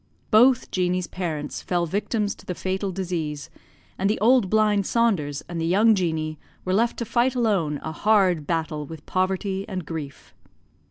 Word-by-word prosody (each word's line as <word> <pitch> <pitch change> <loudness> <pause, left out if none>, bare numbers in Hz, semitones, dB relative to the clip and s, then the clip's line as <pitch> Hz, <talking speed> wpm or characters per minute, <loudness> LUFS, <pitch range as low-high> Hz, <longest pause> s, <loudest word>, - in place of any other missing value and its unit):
Both 245 +3 +5
Jeanie's 180 -1 0
parents 160 -6 -4
fell 175 -1 0
victims 205 +4 -1
to - - -17
the 180 - -3
fatal 190 +2 -2
disease, 170 -5 -4 0.5
and 195 +1 +2
the 215 - 0
old 230 -1 +4
blind 210 -2 +2
Saunders 175 -12 +1
and 170 -1 -4
the - - 0
young 210 +6 +5
Jeanie 160 -5 -1 0.3
were 185 - 0
left 230 +4 +1
to 235 - -3
fight 240 +3 +1
alone 190 - +1
a 160 - -4
hard 185 -5 +2
battle 160 -2 -1
with 160 -1 -10
poverty 190 +1 -1
and 185 -4 -4
grief. 150 -3 -7
185 Hz, 165 wpm, -24 LUFS, 165-210 Hz, 0.5 s, Both